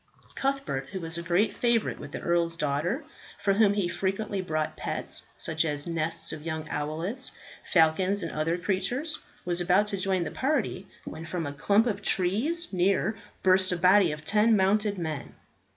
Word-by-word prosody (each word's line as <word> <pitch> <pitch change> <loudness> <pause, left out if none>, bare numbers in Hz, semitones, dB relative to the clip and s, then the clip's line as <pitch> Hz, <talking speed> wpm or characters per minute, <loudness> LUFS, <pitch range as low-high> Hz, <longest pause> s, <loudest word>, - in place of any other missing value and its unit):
Cuthbert 270 - -2
who 190 - -5
was 165 -1 -5
a 170 - -3
great 175 +5 +2
favourite 235 -2 +1
with - - -8
the - - -5
earl's 170 -1 +1
daughter, 165 - -1 0.3
for 200 - +1
whom 205 0 +4
he 200 -4 +1
frequently 195 +3 -2
brought 155 -3 -2
pets, - - -1
such 160 0 +2
as 145 -2 -1
nests 165 -1 -2
of 155 - -7
young 160 0 -4
owlets, 165 - -2 0.4
falcons, 185 +3 +3
and 165 - -3
other 160 +3 0
creatures 245 - -2 0.3
was 175 0 -1
about 185 +4 +4
to 200 - -2
join 190 -1 0
the - - -4
party 260 -9 -1 0.2
when 160 +1 -7
from 170 -1 -3
a 145 - -4
clump 200 +10 +3
of 205 -4 -1
trees 220 - +1
near 190 +4 +2 0.3
burst 185 0 +4
a 180 - 0
body 185 0 +5
of 150 0 -7
ten 215 +3 +4
mounted 205 +1 +2
men. 155 -5 -4
185 Hz, 175 wpm, -28 LUFS, 165-205 Hz, 0.4 s, body